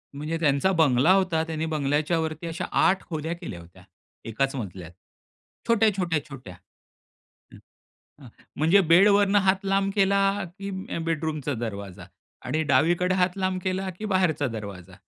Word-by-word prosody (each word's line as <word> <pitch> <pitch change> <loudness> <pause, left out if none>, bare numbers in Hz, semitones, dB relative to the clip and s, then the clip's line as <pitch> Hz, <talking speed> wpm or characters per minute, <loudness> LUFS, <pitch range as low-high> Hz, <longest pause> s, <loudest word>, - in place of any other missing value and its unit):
म्हणजे 155 +3 -3
त्यांचा 150 +3 +2
बंगला 155 -3 +3
होता. 185 -4 +1
त्यांनी 160 -1 -3
बंगल्याच्यावरती 155 +2 -1
अशा 165 +3 -4 0.2
8 190 0 +2
खोल्या 160 0 -3
केल्या 85 - -7
होत्या. 85 +2 -17 0.4
एकाच 135 +5 -1
मजल्यात. 95 -8 -7 0.8
छोट्या, 225 -1 +4
छोट्या, 170 -5 0
छोट्या. 125 -10 -10 1.0
हं. - - -12 0.6
हं, 130 - -12 0.3
म्हणजे 165 +7 +4
बेडवरून 200 +3 +5
हात 195 0 +2
लांब 195 0 +1
केला 200 -1 +3 0.4
की 200 0 -5 0.3
अ, - - -2
बेडरूमचा 155 -3 -2
दरवाजा. 100 -5 -6 0.4
आणि 155 +5 -1
डावीकडे 175 +7 +2
हात 180 0 +1
लांब 185 -1 -1
केला 190 0 -2
की 215 - -4
बाहेरचा 185 -8 +1
दरवाजा. 100 -5 -8
160 Hz, 140 wpm, -25 LUFS, 135-190 Hz, 1.0 s, बेडवरून